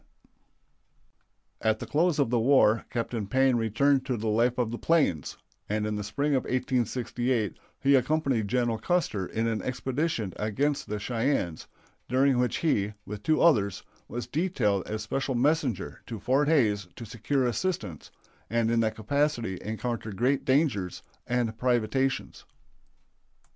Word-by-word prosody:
CUSTER.] 110 - +1
At 110 - +2
the - - -6
close 165 +1 +1
of 140 -5 +1
the 120 - +3
war 115 -3 +4
Captain 115 -3 -3
Payne 130 +3 +3
returned 130 +5 +2
to 125 -3 0
the 110 0 -2
life 120 +3 +2
of 120 -3 0
the 120 - -5
plains, 145 - +1 0.3
and 105 0 0
in 105 0 -2
the 105 - -3
spring 140 +8 -1
of 130 - +1
1868 125 - -1 0.2
he 140 - +3
accompanied 135 -4 +2
General 120 0 0
Custer 135 - 0
in 110 +1 -2
an 115 -1 -1
expedition 130 - -2
against 135 +8 -1
the 105 - -2
Cheyennes, 115 - -1 0.4
during 130 0 +3
which 125 0 +1
he, 105 -10 0
with 105 0 -7
two 155 +4 +2
others, 105 - +3 0.2
was 120 +1 -5
detailed 130 - 0
as 105 0 -3
special 135 +4 -2
messenger 140 0 0
to 115 - -5
Fort 135 +6 +2
Hays 105 - +2
to 115 - -8
secure 125 +4 -1
assistance, 120 - -2 0.4
and 115 +1 +1
in 115 - +2
that 110 -1 +1
capacity 120 -4 -1
encountered 110 -1 -4
great 130 +4 +1
dangers 130 - +1 0.2
and 120 -2 0
privations. 125 +2 0
120 Hz, 150 wpm, -28 LUFS, 110-135 Hz, 0.4 s, war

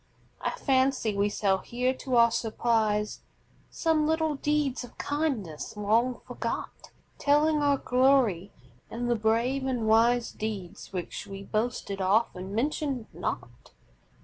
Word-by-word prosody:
I - - 0
fancy 260 -5 +1
we 200 +1 +2
shall 195 -2 +1
hear 250 +4 -1
to 260 -1 -3
our 235 -1 +6
surprise 220 -2 0 0.5
Some 315 -2 +1
little 320 -1 +1
deeds 290 -2 0
of 245 - -12
kindness, 265 - -3
long 230 +4 +1
forgot, - - -5 0.3
Telling 295 +1 +3
our 285 -1 +3
glory, 250 -9 +2 0.4
and 240 +1 -3
the - - +3
brave 235 +5 +1
and 245 -4 -1
wise 230 +2 +4
Deeds 205 -5 -6
which 185 +2 -5
we 195 0 -7
boasted 215 -2 -2
often, 195 -1 +1
mentioned 270 -1 -1
not. - - -6
235 Hz, 125 wpm, -28 LUFS, 210-275 Hz, 0.5 s, our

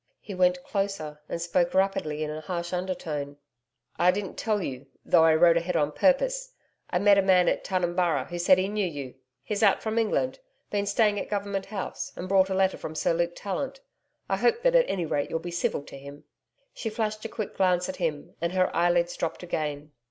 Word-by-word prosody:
He 205 - -8
went 180 -1 +2
closer 195 -7 -3
and - - -3
spoke 175 +1 0
rapidly 155 -6 +1
in 150 - -3
a 155 +1 -5
harsh 170 +2 -4
undertone. 155 -6 -3 0.6
'I 175 - +5
didn't 195 -1 -4
tell 215 -2 0
you 135 -6 -5 0.2
though 165 -2 +5
I 160 -1 +5
rode 170 +1 +5
ahead 170 +1 -1
on 150 -2 +2
purpose - - +1 0.4
I 180 - +1
met 200 +1 +5
a - - +5
man 185 -2 +4
at - - +1
Tunumburra 175 -6 0
who 175 0 -6
said 185 +2 +5
he 185 +1 +1
knew 205 -1 -1
you. 140 -6 -6 0.3
He's 210 -2 -3
out 205 -3 +4
from 220 +1 0
England 230 - 0 0.3
been 205 -1 -1
staying 205 0 +2
at - - -5
Government 200 -1 -2
House, 195 -2 -5
and 180 - -6
brought 190 0 +4
a 190 - -1
letter 190 0 +2
from 160 - -7
Sir 160 - +1
Luke 170 +1 0
Tallant. 275 - -4 0.5
I - - 0
hope 470 0 +2
that - - +4
at - - +4
any 180 -3 -1
rate 145 -2 -1
you'll - - -1
be 175 +2 -6
civil 170 -4 -1
to 140 - -11
him.' 140 +1 -11 0.5
She 225 - -4
flashed 215 -1 -3
a - - -3
quick 215 -1 -5
glance 180 -1 +2
at 185 - -5
him, 155 -4 -3
and 170 +1 -1
her 185 -1 +1
eyelids 175 0 +2
dropped 165 +1 -3
again. 150 -3 -3
180 Hz, 210 wpm, -27 LUFS, 165-200 Hz, 0.6 s, I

